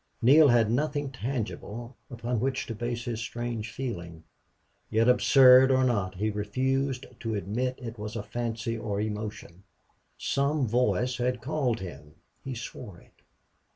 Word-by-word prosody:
Neale 145 +6 +7
had 115 -4 +4
nothing 145 +2 -1
tangible 120 -1 -5
upon 120 -1 -3
which 130 +2 -1
to 115 - -5
base 120 +1 -4
his 115 -2 -3
strange 115 -1 -4
feeling. 85 -11 -6 0.7
Yet 115 +2 +2
absurd 130 +1 +7
or 130 0 +4
not, 100 -7 0
he 105 +3 -1
refused 130 +6 -1
to 115 -2 -3
admit 115 +7 -2
it 115 -3 -7
was 105 +2 -5
fancy 115 -1 -2
or 110 -3 -3
emotion. 105 -4 -5 0.6
Some 140 0 0
voice 125 +2 +1
had 125 0 0
called 125 -3 -1
him. 75 -5 -9 0.3
He 135 -1 -5
swore 115 -5 -8
it. - - -25
120 Hz, 140 wpm, -28 LUFS, 110-130 Hz, 0.7 s, Neale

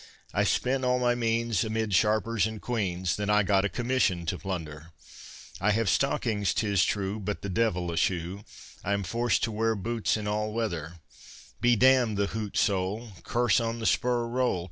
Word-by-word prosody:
I - - +2
spent 130 +1 +1
all 125 0 +2
my 125 -1 +2
means 115 -3 0
Amid 110 -2 -2
sharpers 110 +2 +2
and 110 -1 -7
queans; 95 -7 -2
Then 105 0 -2
I 105 0 +4
got 100 0 +2
a - - 0
commission 120 -9 0
to 85 +2 -2
plunder. 80 -5 -6 0.7
I 105 - +1
have 110 0 +1
stockings 110 -5 +1
'tis 100 -5 +2
true, 100 +1 -1
But 105 0 -4
the 100 - -3
devil 90 -3 0
a 85 - -4
shoe, 90 +4 -1 0.4
I 100 - 0
am 100 0 -1
forced 115 +5 0
to 115 - 0
wear 110 +1 0
boots 110 +2 -1
in 105 -1 -4
all 105 +1 -1
weather, 85 -9 -3 0.7
Be 120 0 +4
d——d 125 -2 +4
the 100 0 +1
hoot 110 -2 -4
sole, 100 +3 0
Curse 120 -3 +2
on 115 0 -2
the 115 - -5
spur 120 0 +1
roll. 125 -5 0
105 Hz, 185 wpm, -28 LUFS, 95-115 Hz, 0.7 s, I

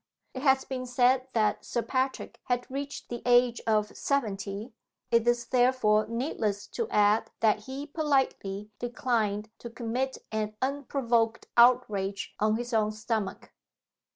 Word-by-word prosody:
It 260 - -5
has 265 -1 +3
been 255 -1 -4
said 250 +1 +3
that 215 -2 +1
Sir 235 - -2
Patrick 260 0 -2
had 245 0 0
reached 280 +1 -5
the 240 -1 -5
age 245 0 +4
of 215 -1 +1
seventy 210 -4 -2 0.4
it 230 0 +3
is, 240 0 +2
therefore, 245 -4 +3
needless 230 -4 -2
to 465 - -3
add 210 +1 +3
that 215 -1 +2
he 270 +2 -5
politely 265 -10 -1
declined 225 -4 -1
to 235 - -7
commit 245 +3 -3
an 215 -1 -2
unprovoked 260 -4 0
outrage 215 -5 +3
on 215 +1 +2
his 240 +1 -4
own 215 -1 +2
stomach. 215 -2 -3
235 Hz, 135 wpm, -28 LUFS, 215-260 Hz, 0.4 s, age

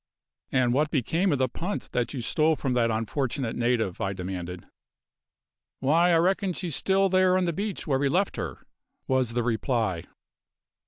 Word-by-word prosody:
"And 125 -2 +2
what 150 +3 +2
became 165 - +1
of 145 - +2
the 130 0 +2
punt 175 +11 -5
that 120 -2 -1
you 135 - -4
stole 155 +6 +2
from 135 -3 -2
that 120 -2 +2
unfortunate 115 +2 -2
native?" 120 -5 0
I 95 -2 -1
demanded. 90 -1 -6 1.1
"Why, 165 +6 +3
I 165 - +5
reckon 185 +2 +1
she's 170 -4 -3
still 195 0 +2
there 185 0 +3
on 185 - +1
the 170 - 0
beach 200 +3 -4
where 135 -4 +1
we 140 0 +2
left 190 +6 +1
her," - - -5 0.4
was 130 -3 +1
the 120 0 0
reply. 115 -6 -1
135 Hz, 170 wpm, -26 LUFS, 115-175 Hz, 1.1 s, I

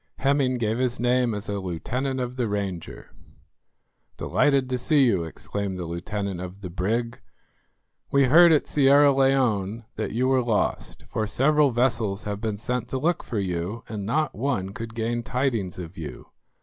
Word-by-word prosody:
Hemming 135 -2 +2
gave 110 0 -1
his 125 -1 0
name 125 -1 +2
as 105 - -6
a 100 0 -2
lieutenant 125 - -3
of 125 0 -3
the 120 -4 -1
Ranger. 100 -5 -5 1.1
"Delighted 140 -3 +2
to 125 - 0
see 140 +2 +4
you," 95 -8 +2
exclaimed 95 +3 -5
the 90 - -4
lieutenant 95 +2 -4
of 90 +2 -8
the 90 -3 -6
brig; 115 +7 -2 0.9
"we 140 -1 +4
heard 170 +6 +7
at 150 - +3
Sierra 140 0 +5
Leone 120 -6 +1
that - - -2
you 125 +3 +1
were 130 -1 +3
lost, 115 -3 -1
for 110 -1 -2
several 150 +6 +3
vessels 115 -5 0
have 105 0 -4
been 110 -2 -2
sent 125 +3 -3
to 130 - -2
look 165 +6 0
for 115 - -4
you, 95 +3 -3
and 105 -2 -5
not 150 +10 0
one 115 -6 -1
could 115 +2 -7
gain 115 +1 -1
tidings 120 -7 -1
of 90 0 -8
you. 75 -6 -8
115 Hz, 170 wpm, -25 LUFS, 100-130 Hz, 1.1 s, heard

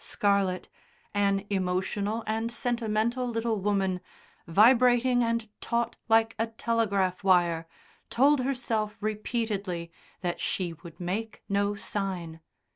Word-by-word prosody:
Scarlett, 200 -3 +1 0.5
an 200 -1 +1
emotional 200 +3 -1
and 225 +2 -1
sentimental 235 0 0
little 225 -2 -1
woman, 190 -2 0 0.5
vibrating 245 +6 +5
and 230 -1 0
taut 235 0 -1
like 225 0 +4
a 225 - +1
telegraph 205 -5 0
wire, 175 -3 +3 0.4
told 280 +3 +4
herself 230 -5 -1
repeatedly 210 -5 -2 0.3
that 175 -2 -2
she 180 -3 -1
would 165 0 -13
make 200 +5 -4
no 200 +1 +1
sign. 185 -6 -4
210 Hz, 110 wpm, -28 LUFS, 190-230 Hz, 0.5 s, vibrating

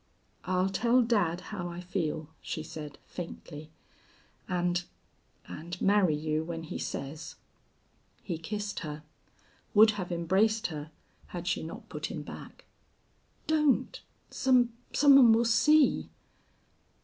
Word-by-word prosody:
"I'll 185 0 +1
tell 235 +5 +3
dad 190 -7 +1
how 180 -4 -3
I 170 0 -7
feel," 165 -4 -3
she 155 - -4
said, 155 -3 -8
faintly, 155 -3 -8 0.8
"and 180 -1 0 0.6
and 170 +3 -7
marry 195 -5 +3
you 155 +1 -1
when 165 0 -5
he 160 - -6
says." 150 +4 -5 0.9
He 170 -5 -4
kissed 205 +4 -4
her, 150 -3 -6 0.7
would 215 +1 +8
have 185 -4 -5
embraced 190 +6 +2
her 150 0 -6 0.4
had 175 -1 -6
she 175 - 0
not 160 +1 -8
put - - -5
him - - -6
back. - - -11 0.8
"Don't! 300 -3 +2 0.3
Some 250 -3 +3 0.2
some 280 -1 +7
one 240 -4 +8
will 230 +1 +3
see." 300 +6 +4
180 Hz, 125 wpm, -30 LUFS, 160-220 Hz, 0.9 s, would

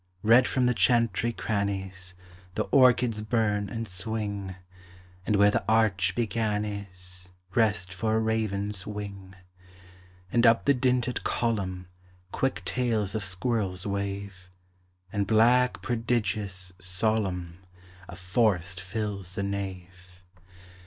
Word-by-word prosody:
Red 115 +4 +6
from 130 -1 +1
the 125 - +3
chantry 115 -2 +2
crannies 95 -4 -2 0.4
The - - +1
orchids 125 -4 +4
burn 105 -2 0
and 115 +2 -4
swing, 100 0 -4 0.7
And 105 - +3
where 100 +1 +5
the - - 0
arch 100 -5 +3
began 110 -2 0
is 90 -3 -6 0.2
Rest 105 -5 +1
for 110 +3 0
a - - +3
raven's 105 -3 -1
wing; 100 -2 -7 1.0
And 120 0 +4
up 115 0 +4
the 140 - +5
dinted 125 -1 0
column 95 -6 -1 0.4
Quick 135 - -1
tails 115 -6 0
of 110 -2 -2
squirrels 95 -1 -1
wave, 100 -2 -4 0.6
And 100 -2 0
black, 120 +4 +4
prodigious, 105 -6 -1
solemn, 90 -2 -1 0.5
A - - -8
forest 90 -2 0
fills 100 -1 -4
the 100 - -2
nave. 95 -2 -6
105 Hz, 115 wpm, -27 LUFS, 95-115 Hz, 1.0 s, Red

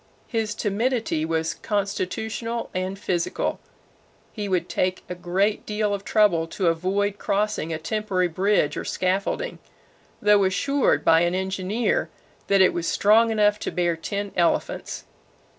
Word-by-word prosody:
His 220 -3 -2
timidity 220 -6 0
was 160 0 -1
constitutional 220 +3 -3
and 185 +1 -2
physical. 175 -3 -1 0.7
He 205 -3 -4
would 180 -2 0
take 185 0 -1
a - - -4
great 185 +4 0
deal 210 -1 -1
of 200 -1 -3
trouble 200 -7 +3
to 175 +1 0
avoid 195 +5 0
crossing 205 -5 -1
a 160 - -1
temporary 190 +1 -1
bridge 185 -1 +1
or - - -3
scaffolding, 195 - -1 0.6
though 205 -1 +4
assured 275 +9 +1
by 165 - +6
an 175 +1 +1
engineer 190 - -1 0.4
that 195 -1 +4
it 185 - +5
was 170 -1 -2
strong 220 +3 +4
enough 210 -1 +2
to - - -3
bear 175 -1 +1
ten 200 +4 -4
elephants. 170 -2 0
195 Hz, 140 wpm, -24 LUFS, 180-210 Hz, 0.7 s, by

